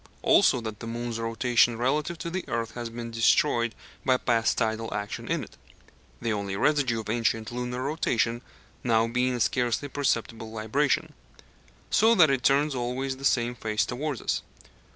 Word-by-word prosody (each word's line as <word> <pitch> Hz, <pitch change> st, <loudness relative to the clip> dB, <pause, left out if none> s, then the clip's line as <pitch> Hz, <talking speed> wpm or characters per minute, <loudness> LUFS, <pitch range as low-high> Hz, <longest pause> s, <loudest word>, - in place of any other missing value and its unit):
Also 125 Hz, -, +5 dB
that 110 Hz, -2 st, -6 dB
the 115 Hz, -, -7 dB
moon's 120 Hz, 0 st, -4 dB
rotation 115 Hz, +1 st, +2 dB
relative 145 Hz, +7 st, 0 dB
to 170 Hz, 0 st, -5 dB
the 185 Hz, +1 st, -2 dB
earth 115 Hz, -1 st, -2 dB
has 120 Hz, -1 st, -5 dB
been 115 Hz, 0 st, -7 dB
destroyed 115 Hz, +1 st, +2 dB, 0.3 s
by 130 Hz, -2 st, +3 dB
past 115 Hz, -2 st, +1 dB
tidal 110 Hz, 0 st, -1 dB
action 105 Hz, 0 st, -4 dB
in -, -, -1 dB
it -, -, -13 dB, 0.6 s
(the 115 Hz, -2 st, -1 dB
only 100 Hz, -2 st, -3 dB
residue 130 Hz, -2 st, +1 dB
of -, -, -12 dB
ancient 115 Hz, 0 st, 0 dB
lunar 125 Hz, +1 st, -3 dB
rotation 120 Hz, -5 st, 0 dB, 0.4 s
now 115 Hz, -2 st, +3 dB
being 125 Hz, +2 st, 0 dB
a -, -, -3 dB
scarcely 120 Hz, +3 st, 0 dB
perceptible 115 Hz, -5 st, -2 dB
libration), 110 Hz, +6 st, 0 dB, 0.8 s
so 225 Hz, +2 st, +5 dB
that 160 Hz, -7 st, +6 dB
it 135 Hz, -2 st, +1 dB
turns 140 Hz, +3 st, +3 dB
always 130 Hz, +2 st, -2 dB
the 135 Hz, -, -12 dB
same 120 Hz, -3 st, +2 dB
face 110 Hz, -2 st, -1 dB
towards 135 Hz, +1 st, -4 dB
us. -, -, 0 dB
120 Hz, 165 wpm, -27 LUFS, 115-135 Hz, 0.8 s, that